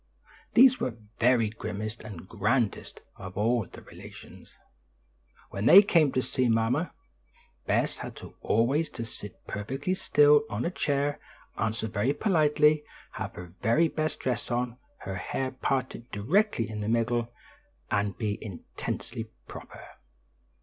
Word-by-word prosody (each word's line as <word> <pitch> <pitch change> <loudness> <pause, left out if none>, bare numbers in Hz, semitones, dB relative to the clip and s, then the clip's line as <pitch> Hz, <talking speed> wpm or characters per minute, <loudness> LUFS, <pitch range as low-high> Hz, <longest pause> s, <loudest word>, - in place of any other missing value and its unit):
These 255 +1 +7
were - - 0
the 115 -2 -14 0.2
very 120 -2 +4
grimmest 110 0 -5
and 95 -4 -9
grandest 110 +2 -1 0.2
of 95 0 -9
all 115 -1 +1
the - - -13
relations. - - -13 1.0
When 100 +3 -1
they 200 +3 +10
came 165 -8 +4
to 130 - +1
see 130 -3 0
mamma, 115 +9 +1 0.8
Bess - - +1
had - - -7 0.2
always 135 +9 +2
to 115 - -3
sit 105 -3 -10
perfectly 135 - -3
still 150 -5 +5
on 105 - -2
a 170 - 0
chair, 145 -3 0 0.4
answer 110 0 -1
very 110 +6 0
politely, 155 -5 +3 0.3
have - - -6
her 90 -1 -9
very 155 +10 +3
best 155 -1 -2
dress 125 -2 -2
on, 120 0 -2 0.2
her 95 0 -5
hair 130 +6 -3
parted 130 -2 -2
directly 130 - +1
in 105 -1 -5
the 105 - -2
middle 115 0 +1 0.6
and 100 -2 0
be 105 -3 -3
intensely 110 +3 -6 0.2
proper. - - -10
120 Hz, 135 wpm, -28 LUFS, 110-145 Hz, 1.0 s, they